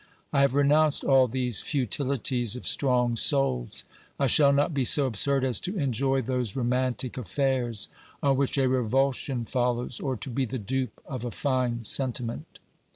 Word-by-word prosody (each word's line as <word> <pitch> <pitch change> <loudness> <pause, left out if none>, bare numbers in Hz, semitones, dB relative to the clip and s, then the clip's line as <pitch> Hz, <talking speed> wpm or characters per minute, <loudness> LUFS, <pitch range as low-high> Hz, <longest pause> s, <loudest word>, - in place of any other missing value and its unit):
I 140 - +3
have 140 -1 +2
renounced 145 +1 +3
all 135 -2 +4
these 125 -2 0
futilities 130 -3 -1
of 125 - -6
strong 125 -3 +1
souls; 115 - 0 0.3
I 140 - +2
shall 140 +2 +4
not 145 +3 +1
be 135 -2 0
so 140 +3 +4
absurd 135 +3 +2
as 130 -2 +1
to 190 +3 -4
enjoy 135 -2 0
those 125 -4 -2
romantic 125 0 -1
affairs 120 -1 -1 0.4
on 140 -1 +3
which 140 +1 0
a 135 -1 +3
revulsion 130 0 0
follows, 125 0 -1
or 135 -3 -2
to 130 - -7
be 130 +2 -1
the 130 +2 -5
dupe 130 +2 -3
of 130 -4 -6
a 120 - -3
fine 125 -3 -1
sentiment. 125 -1 -2
130 Hz, 160 wpm, -26 LUFS, 120-140 Hz, 0.4 s, all